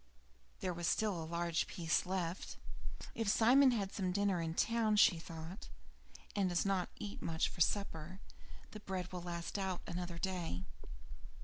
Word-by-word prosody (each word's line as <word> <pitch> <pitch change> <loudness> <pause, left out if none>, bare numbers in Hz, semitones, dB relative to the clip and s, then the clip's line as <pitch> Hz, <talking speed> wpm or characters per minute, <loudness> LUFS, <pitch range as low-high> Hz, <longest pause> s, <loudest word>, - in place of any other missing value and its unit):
There 185 - 0
was 170 -1 -2
still 205 -6 +1
a - - -4
large 170 -1 0
piece 165 -1 0
left. 185 -1 -2 0.6
"If 225 -2 -2
Simon 255 +6 +7
has 240 -3 +2
had 195 -1 -3
some 185 -3 0
dinner 195 -2 +2
in 165 0 -2
town," 225 -1 +2
thought 165 -1 +2
she, - - -17
"and 195 -3 +2
does 175 +1 +1
not 195 -2 +1
eat 210 -2 -6
much 160 -1 +1
for 175 - -6
supper, 185 -1 0 0.5
the 215 - -7
bread 190 -3 -4
will 180 -1 -4
last 170 +2 -4
out 190 -2 -1
another 175 0 -4
day." 170 - -2
180 Hz, 165 wpm, -36 LUFS, 170-200 Hz, 0.6 s, Simon